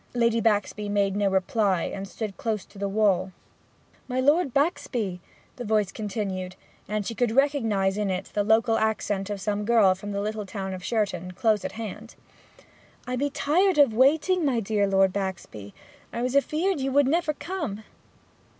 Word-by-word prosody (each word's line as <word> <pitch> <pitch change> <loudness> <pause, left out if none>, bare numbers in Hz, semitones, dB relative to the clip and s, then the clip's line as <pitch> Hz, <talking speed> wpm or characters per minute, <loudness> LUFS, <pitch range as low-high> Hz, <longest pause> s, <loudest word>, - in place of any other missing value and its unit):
Lady 230 -1 +2
Baxby 210 -1 0
made 200 -1 +1
no 205 -1 +2
reply, 190 -1 +1
and 195 0 -5
stood 210 -1 -5
close 220 -4 -3
to 200 - -15
the 200 0 -1
wall. 195 -3 +2 0.8
'My 255 0 -2
Lord 290 +3 +3
Baxby,' 240 - -1 0.4
the 245 - -5
voice 215 -3 +1
continued; 195 -4 -4 0.3
and 210 0 -2
she 230 - -3
could 240 +1 +1
recognize 225 -8 +1
in 205 -2 0
it 185 0 -3
the 205 - +1
local 225 +2 +3
accent 210 -2 -1
of 205 -1 -3
some 210 +1 -2
girl 215 -4 +5
from 205 +2 -7
the 200 - -2
little 210 0 -3
town 190 -1 -5
of 185 -1 -7
Sherton, 185 -6 -2
close 215 +2 +1
at - - -4
hand. 225 0 -7 0.9
'I 250 - -3
be 285 +3 0
tired 345 +6 +2
of 280 -6 +5
waiting, 315 +9 +3
my 265 -5 +2
dear 205 -1 0
Lord 195 -1 +3
Baxby! 180 - -5 0.4
I 235 - -3
was 250 +2 -1
afeard 310 +5 +1
you 270 0 -1
would 280 0 +4
never 315 +1 +1
come!' 300 - -5
215 Hz, 175 wpm, -26 LUFS, 195-250 Hz, 0.9 s, girl